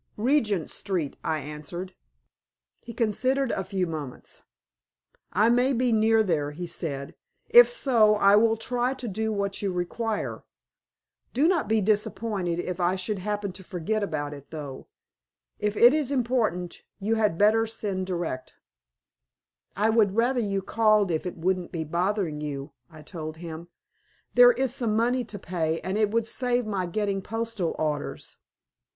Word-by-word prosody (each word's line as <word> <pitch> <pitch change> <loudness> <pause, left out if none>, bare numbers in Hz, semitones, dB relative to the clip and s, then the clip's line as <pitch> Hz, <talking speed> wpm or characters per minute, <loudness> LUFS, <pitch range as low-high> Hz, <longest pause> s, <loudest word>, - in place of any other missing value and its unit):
"Regent 215 - +1
Street," 180 -8 -3
I 155 -1 -1
answered. 150 +6 -7 0.9
He 235 - -10
considered 255 +4 0
a 190 - -2
few 190 0 -1
moments. 155 -6 -7 0.9
"I 220 +3 +3
may 250 +3 +3
be 250 0 +1
near 220 0 +4
there," 155 -7 0
he 165 +4 -6
said. 145 -5 -4 0.4
"If 485 +1 +9
so 235 - +4
I 200 -1 +5
will 225 +1 +4
try 245 +3 -1
to 250 -2 -6
do 220 +2 -2
what 200 -1 -2
you 200 -2 -1
require. 205 +5 -3 0.9
Do 285 +6 +4
not 345 - +1
be 220 0 +2
disappointed 205 -3 0
if 180 0 -4
I 180 +1 +2
should 190 +2 -3
happen 205 0 -3
to 190 +1 -11
forget 185 +4 -2
about 150 -6 -3
it, 140 -1 -12
though. 145 -4 -7 0.7
If 210 0 -1
it 240 +3 +7
is 300 -3 0
important 230 -9 -1 0.2
you 210 +3 0
had 210 -6 +1
better 220 +3 +4
send 200 -4 -3
direct." 170 -8 -4 1.2
"I 215 +2 +3
would 210 -3 +3
rather 245 +2 +2
you 195 -3 -1
called 215 -3 +3
if 160 +2 -1
it 180 - -6
wouldn't 180 +1 -1
be 165 -2 -3
bothering 170 -1 -1
you," 145 0 -5 0.2
I 155 -1 -13
told 155 -1 -7
him. 165 0 -8 0.7
"There - - +8
is 265 - 0
some 225 -4 0
money 245 +3 +1
to 210 -2 -8
pay, 165 -3 -2
and 190 +1 -3
it 215 -1 +2
would 230 +1 0
save 245 0 0
my 195 -4 -2
getting 200 +1 -1
postal 225 -4 -3
orders." 150 -2 -3
205 Hz, 155 wpm, -26 LUFS, 175-225 Hz, 1.2 s, If